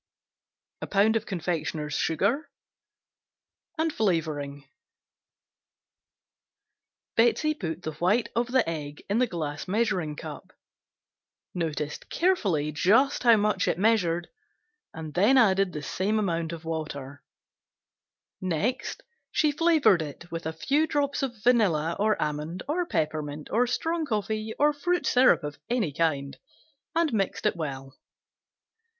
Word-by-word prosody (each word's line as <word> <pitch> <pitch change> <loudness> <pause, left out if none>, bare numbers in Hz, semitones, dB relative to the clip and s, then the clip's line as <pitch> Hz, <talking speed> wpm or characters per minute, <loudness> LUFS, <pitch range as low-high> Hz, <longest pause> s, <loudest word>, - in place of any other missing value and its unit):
Sugar 215 +3 +3
(confectioner's), 160 -4 -2
1 160 - -2 1.6
pound 320 0 0
Flavoring. 150 -8 -1 2.5
Betsey 240 +7 +3
put 175 - -5
the 155 - -3
white 185 +9 +1
of 235 +1 +1
the 255 -4 +2
egg 150 -3 -5
in 215 - +2
the 250 - +3
glass 155 -6 -4
measuring 185 -7 0
cup, - - -9 1.0
noticed 150 -4 -3
carefully 195 - +1
just 225 - +3
how 235 -2 +6
much 210 -3 +1
it - - +1
measured 180 -5 +2 0.6
and 160 -2 -7
then 210 +9 +4
added 195 -5 +4
the 150 -3 -6
same 195 +9 -1
amount 170 -6 -1
of 165 -1 -8
water, 145 -4 -5 1.2
next 190 - -2 0.3
she 305 -2 +2
flavored 305 - +4
it 155 +3 -8
with 165 -1 -4
a - - -1
few 285 - +1
drops 285 -1 0
of 240 -6 -4
vanilla 175 -10 +3
or 215 +1 +2
almond 150 +4 -3
or 345 +4 -1
peppermint 155 - -2
or 245 +3 +3
strong 325 +5 -1
coffee 215 -1 -2
or 295 +1 +4
fruit 350 +5 -1
syrup 255 -8 +4
of 145 0 -6
any 225 - 0
kind, 140 -3 -1 0.6
and 330 -5 +2
mixed 200 -1 -1
well. 135 -4 -5
185 Hz, 120 wpm, -27 LUFS, 155-240 Hz, 2.5 s, how